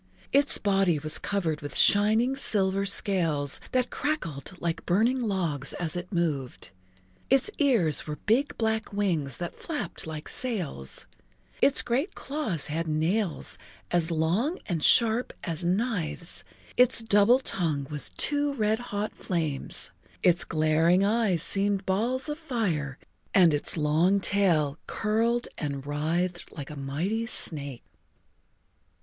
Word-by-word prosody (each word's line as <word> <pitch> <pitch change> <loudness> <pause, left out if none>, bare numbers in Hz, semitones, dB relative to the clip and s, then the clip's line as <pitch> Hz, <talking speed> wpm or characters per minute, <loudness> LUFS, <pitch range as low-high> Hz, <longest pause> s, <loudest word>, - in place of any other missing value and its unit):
Its 280 +1 +4
body 195 -5 +2
was 155 +1 -1
covered 170 -7 -2
with 145 - -4
shining 220 +6 +4
silver 195 -6 +1
scales 165 -8 +1
that 255 -1 0
crackled 180 - -3
like 170 -1 -2
burning 230 +8 +2
logs 170 - -1
as 170 -2 -3
it 175 0 -5
moved, 145 - -2 0.6
its 270 +10 +3
ears 225 - +2
were 150 - -3
big 235 - 0
black 220 -1 -1
wings 170 - -1
that 175 -1 -5
flapped 300 - -5
like 155 -1 -6
sails, 180 - -2 0.6
its 280 - +5
great 275 +11 -1
claws 240 - -2
had 165 +2 -2
nails 160 - -1 0.3
as 175 -2 +3
long 175 - 0
and 165 -5 -2
sharp 230 +1 +4
as 170 -1 -3
knives, 180 -3 -1 0.3
its 250 -2 +4
double 215 +2 +5
tongue 165 - -1
was 150 -2 0
two 290 0 0
red 215 -2 +1
hot 210 -3 -4
flames, 160 -6 -2 0.3
its 175 -1 +5
glaring 160 +4 +2
eyes 205 -5 +2
seemed 200 -1 0
balls 240 +8 0
of 300 +1 -4
fire 180 - -2 0.4
and 175 -5 +6
its 145 +3 -2
long 160 +6 +3
tail 170 -7 +2
curled 230 +3 0
and 140 -3 -4
writhed 165 +5 -2
like 145 0 -6
a - - -7
mighty 155 +11 -2
snake. 140 - -3
185 Hz, 130 wpm, -27 LUFS, 155-225 Hz, 0.6 s, and